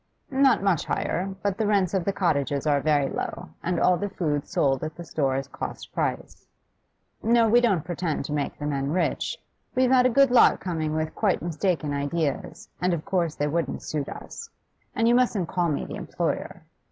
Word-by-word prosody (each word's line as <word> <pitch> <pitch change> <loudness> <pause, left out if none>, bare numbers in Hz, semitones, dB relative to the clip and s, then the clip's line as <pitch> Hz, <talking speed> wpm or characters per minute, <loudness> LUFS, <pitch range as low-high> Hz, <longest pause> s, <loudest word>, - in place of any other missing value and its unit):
'Not 270 -6 +4
much 190 -6 +2
higher, 190 +2 -2
but 200 0 -1
the 220 - +1
rents 200 -4 +2
of 190 -3 0
the 200 - +2
cottages 145 -7 0
are 145 -2 +2
very 145 -2 +2
low, - - -5
and 180 +1 -1
all 180 -1 +4
the 205 +2 -3
food 150 -7 -2
sold 135 -1 +1
at 155 0 -4
the 175 - -8
store 140 -5 -1
is 135 0 -2
cost - - -7
price. - - -3 0.7
No, 230 0 +4
we 240 +3 +5
don't 195 -10 +2
pretend 175 -5 -2
to 150 - -4
make 145 -1 -2
the 145 - -5
men 140 -2 -1
rich. 180 +4 -1 0.4
We've 255 0 +3
had 255 -1 +6
a - - +2
good 275 +1 +4
lot 250 - +6
coming 160 -4 -2
with 155 0 -2
quite 200 -7 0
mistaken 170 -3 -1
ideas, 155 +6 -2
and 180 -1 +2
of 155 - -7
course 170 -5 0
they 145 - -1
wouldn't 165 +3 -2
suit 150 -3 -3
us. 460 - -8 0.5
And 230 - +2
you 235 - +5
mustn't 230 -8 +2
call 175 -2 0
me 145 - -1
the - - -6
employer. - - -3
170 Hz, 200 wpm, -25 LUFS, 150-200 Hz, 0.7 s, had